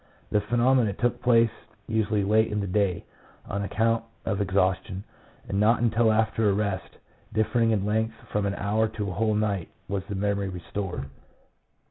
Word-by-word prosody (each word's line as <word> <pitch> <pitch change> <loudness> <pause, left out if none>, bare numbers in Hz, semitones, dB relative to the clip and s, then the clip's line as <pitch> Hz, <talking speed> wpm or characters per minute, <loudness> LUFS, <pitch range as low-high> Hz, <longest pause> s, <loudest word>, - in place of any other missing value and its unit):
The 105 - +3
phenomenon 120 0 +2
took 120 +2 0
place 115 -2 +4 0.3
usually 110 -2 0
late 110 +2 +3
in 105 - 0
the 100 - -1
day, 95 -2 0 0.4
on 100 - -2
account 115 +3 +1 0.2
of 100 0 0
exhaustion, 95 0 0 0.4
and 100 - -1
not 110 +3 +4
until 115 -1 +3
after 110 0 +2
a - - +3
rest 100 -2 -2 0.3
differing 110 +2 +2
in 105 -3 +1
length 110 +1 0 0.2
from 105 -1 0
an 100 - -2
hour 110 +2 +1
to 105 -2 -4
a - - -5
whole 110 +3 +1
night, 100 -5 -1 0.2
was 100 -1 -2
the 100 - -4
memory 100 0 0
restored. 90 -2 -5
105 Hz, 165 wpm, -26 LUFS, 100-110 Hz, 0.4 s, place